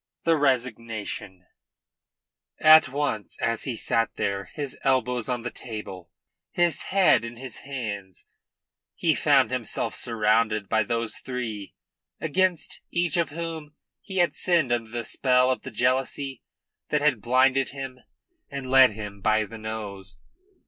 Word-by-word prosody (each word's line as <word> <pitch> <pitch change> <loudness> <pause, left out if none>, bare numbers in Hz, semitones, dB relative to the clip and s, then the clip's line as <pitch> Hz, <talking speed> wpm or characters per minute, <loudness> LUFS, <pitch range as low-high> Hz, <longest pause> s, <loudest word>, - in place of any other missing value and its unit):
THE 165 -1 +3
RESIGNATION 115 - -2 1.1
At 155 +1 +7
once, 135 -6 -2
as 115 0 -1
he 130 -4 -2
sat 115 +1 0
there, 100 -1 -2
his 140 +6 -5
elbows 125 -3 +1
on 125 -2 -2
the 120 - -4
table, 100 -7 -8 0.4
his 175 -2 +1
head 190 - +4
in 115 +1 -6
his 130 -1 -5
hands, 105 -9 -6 0.7
he - - +2
found - - +3
himself - - -1
surrounded 110 -2 +1
by 110 - +2
those 115 -1 -1
three, 115 -6 -5 0.4
against 180 +2 0
each 175 -3 0
of 170 -1 +1
whom 160 -1 -6 0.3
he 190 -2 -7
had 175 -1 +3
sinned 170 -8 +2
under 120 -2 -1
the 120 0 -4
spell 125 +2 +3
of 130 - -2
the - - -7
jealousy 130 +2 -1 0.5
that 150 - +1
had 140 -8 +2
blinded 130 +3 +3
him 135 -2 -7 0.5
and 135 -2 -6
led 130 -4 +7
him 100 -2 -8
by 110 +2 +3
the 115 +2 -10
nose. 105 -3 -6
125 Hz, 140 wpm, -25 LUFS, 110-140 Hz, 1.1 s, At